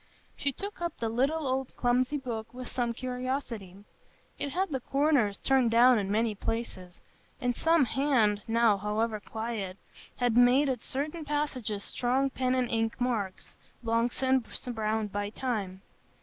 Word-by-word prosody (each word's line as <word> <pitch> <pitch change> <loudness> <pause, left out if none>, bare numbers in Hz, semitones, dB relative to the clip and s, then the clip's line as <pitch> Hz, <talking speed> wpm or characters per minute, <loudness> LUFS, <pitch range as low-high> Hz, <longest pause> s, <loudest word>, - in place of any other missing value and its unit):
She 280 - +1
took 400 +7 -7
up 340 -2 -2
the 230 - -2
little, 280 +7 +1
old, 265 0 -1
clumsy 255 +3 +2
book 235 -4 -5
with 250 -1 -6
some 240 -2 -1
curiosity; 250 -5 -4 0.6
it 285 - -2
had 370 +7 -1
the 265 - -1
corners 275 -6 +2
turned 265 -3 +3
down 240 +1 +6
in 195 -1 -2
many 220 +2 +1
places, 195 -4 -4 0.4
and 245 -2 0
some 325 -1 +4
hand, 235 -5 +2
now 225 -3 +3
forever 215 +2 -1
quiet, 220 -3 -4 0.4
had 245 -2 +1
made 250 +4 +5
at 250 -3 -2
certain 300 +4 -3
passages 270 -8 -2
strong 265 +3 +1
pen 255 0 0
and 250 -2 0
ink 225 0 0
marks, 225 -7 -2 0.3
long 230 +1 +2
since 260 -1 -1
browned 220 -2 -1
by 205 0 -2
time. 205 -5 -3
245 Hz, 150 wpm, -29 LUFS, 220-265 Hz, 0.6 s, down